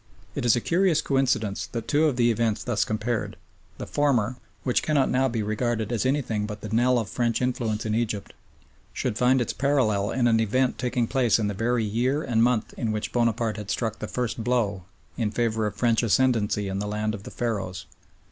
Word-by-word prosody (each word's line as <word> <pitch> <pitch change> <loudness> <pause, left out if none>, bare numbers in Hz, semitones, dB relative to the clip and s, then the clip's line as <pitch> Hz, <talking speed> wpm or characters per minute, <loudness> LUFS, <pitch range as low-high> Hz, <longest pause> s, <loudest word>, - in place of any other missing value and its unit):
It - - -3
is 120 - +5
a 120 - 0
curious 175 +1 +2
coincidence 125 -7 0
that - - -6 0.2
of 150 -2 +3
the 120 - +1
two 120 - +4
events 115 -2 0
thus 115 -5 +1
compared, 110 +2 -2 0.4
the - - -5
former, 130 -5 +1 0.3
which 125 - +1
cannot 150 -3 +1
now 130 +1 +3
be 115 -3 -2
regarded 110 +1 -1
as 120 +2 0
anything 115 -7 0
but 105 -1 -7
the 110 - -6
knell 120 +3 +3
of 115 -3 -1
French 120 -1 0
influence 120 -4 -1
in 110 - -1
Egypt, 110 -3 -2 0.6
should - - -2
find 125 +3 +3
its 120 - -1
parallel 115 -8 +1
in 125 -2 0
an 115 -1 +3
event 125 +4 +1
taking 125 -1 0
place 120 -1 +2
in 105 -2 0
the - - -2
very 115 +3 0
year 125 +8 0
and 115 -2 +1
month 120 -2 +1
in 115 -3 -1
which 105 -1 -3
Bonaparte 115 -2 +1
had 105 -2 -7
struck 110 -2 -2
the - - -4
first 120 -2 -3
blow 110 -7 0 0.3
in 115 -3 0
favour 110 -1 0
of 100 - -5
French 115 0 +2
ascendancy 115 -3 +2
in 95 0 -3
the 105 - -3
land 105 +1 -1
of 105 - -6
the - - -9
Pharaohs. 100 -7 -3
115 Hz, 205 wpm, -25 LUFS, 105-125 Hz, 0.6 s, is